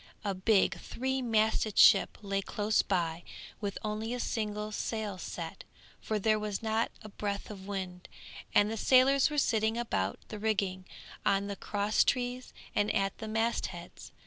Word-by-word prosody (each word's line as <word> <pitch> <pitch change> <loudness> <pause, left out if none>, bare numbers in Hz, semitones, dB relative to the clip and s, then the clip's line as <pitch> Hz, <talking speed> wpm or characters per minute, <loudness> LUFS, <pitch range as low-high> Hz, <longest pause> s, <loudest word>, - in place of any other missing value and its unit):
A 200 - 0
big 195 +2 +2
three 265 +2 -2
masted 220 -2 +1
ship 200 -3 +7
lay 195 -1 -1
close 210 +2 +1
by 170 -3 -1 0.4
with 200 -2 -3
only 215 +2 -2
a - - -4
single 210 -2 -2
sail 210 -3 -3
set, 165 -2 -6 0.4
for 215 - -2
there 215 +1 +2
was 210 0 -3
not 220 +1 +1
a 215 - -8
breath 200 0 -4
of 195 -2 -9
wind, 185 -3 -5 0.5
and 205 +1 +5
the 225 - -3
sailors 265 +5 +5
were 300 - -4
sitting 220 -4 +2
about 100 - -1
the 215 - -6
rigging, 195 -4 -1 0.4
on 200 0 +2
the 200 0 -4
cross 205 +1 +1
trees, 250 0 -1 0.2
and 205 0 +2
at 195 0 0
the 220 - -5
mast 225 +2 0
heads. - - -10
210 Hz, 165 wpm, -31 LUFS, 195-225 Hz, 0.5 s, ship